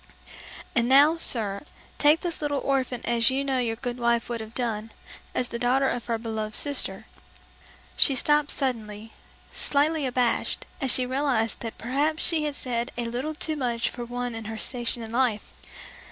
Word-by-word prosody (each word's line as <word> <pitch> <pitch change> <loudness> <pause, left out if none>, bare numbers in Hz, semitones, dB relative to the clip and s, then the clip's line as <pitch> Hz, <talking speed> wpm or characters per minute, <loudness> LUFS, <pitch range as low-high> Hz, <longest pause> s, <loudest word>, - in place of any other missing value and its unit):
And 235 +1 +2
now, 285 +4 +7
sir, 220 -9 +1 0.4
take 300 +2 +5
this 345 -3 -3
little 290 -2 0
orphan 260 -3 -1
as 235 0 +3
you 265 +1 0
know 270 -2 0
your 230 -2 0
good 245 +1 -5
wife 235 -1 +1
would 235 -1 -3
have 220 +1 -10
done, 225 -3 -2 0.4
as 250 - 0
the 235 - -5
daughter 260 +3 +2
of 245 -2 -3
her 230 -1 0
beloved 220 -1 -4
sister...." 285 -1 -1 0.9
She 275 - +6
stopped 295 +3 +2
suddenly, 220 -5 -3 0.4
slightly 295 0 +1
abashed, 250 -1 0 0.2
as 270 - 0
she 255 - +3
realized 255 -3 0
that 230 -1 -6
perhaps 290 +7 0
she 315 -3 +1
had 295 -1 -2
said 240 -2 -2
a 240 - -1
little 255 +7 -3
too 310 +1 -1
much 240 -5 -1
for 240 - -6
one 245 0 -4
in 225 -1 -6
her 220 +1 -5
station 240 0 -3
in 220 - -8
life. 235 -3 0
245 Hz, 175 wpm, -26 LUFS, 230-275 Hz, 0.9 s, now